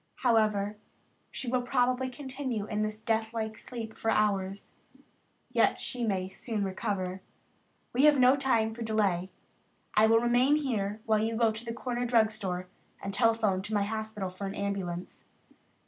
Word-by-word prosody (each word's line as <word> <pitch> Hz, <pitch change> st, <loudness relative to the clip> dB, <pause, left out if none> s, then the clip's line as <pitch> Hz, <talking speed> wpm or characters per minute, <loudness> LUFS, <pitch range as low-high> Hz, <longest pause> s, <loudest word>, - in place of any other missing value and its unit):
However, 215 Hz, -3 st, +2 dB, 0.5 s
she 260 Hz, -, -6 dB
will 250 Hz, +1 st, +1 dB
probably 250 Hz, +1 st, +1 dB
continue 260 Hz, -4 st, -4 dB
in 210 Hz, 0 st, -2 dB
this 215 Hz, 0 st, -2 dB
deathlike 220 Hz, 0 st, -2 dB
sleep 225 Hz, -3 st, -7 dB
for 225 Hz, -, -2 dB
hours, 200 Hz, -2 st, 0 dB, 0.2 s
and -, -, -24 dB, 0.5 s
yet -, -, +3 dB
she 245 Hz, -1 st, -2 dB
may 190 Hz, -4 st, 0 dB
soon 210 Hz, +2 st, -3 dB
recover. 190 Hz, -1 st, -2 dB, 0.7 s
We 260 Hz, +4 st, +4 dB
have 300 Hz, -1 st, +6 dB
no 255 Hz, +1 st, +7 dB
time 230 Hz, -5 st, +1 dB
to 235 Hz, -, -9 dB
delay. 200 Hz, -5 st, +1 dB, 0.6 s
I 215 Hz, +1 st, +5 dB
will 225 Hz, +1 st, +5 dB
remain 245 Hz, +4 st, +4 dB
here 220 Hz, -8 st, -1 dB
while 220 Hz, -1 st, +3 dB
you 225 Hz, +1 st, 0 dB
go 225 Hz, -1 st, +3 dB
to 220 Hz, +1 st, -6 dB
the 230 Hz, -, -4 dB
corner 245 Hz, +1 st, -2 dB
drug 225 Hz, -2 st, +4 dB
store 185 Hz, -4 st, -4 dB, 0.3 s
and 195 Hz, -, -5 dB
telephone 225 Hz, -4 st, +2 dB
to 210 Hz, +2 st, -3 dB
my 205 Hz, -, +3 dB
hospital 215 Hz, -2 st, -3 dB
for 195 Hz, +2 st, -5 dB
an 195 Hz, -, -5 dB
ambulance. 190 Hz, -3 st, -4 dB
220 Hz, 165 wpm, -30 LUFS, 200-240 Hz, 0.7 s, no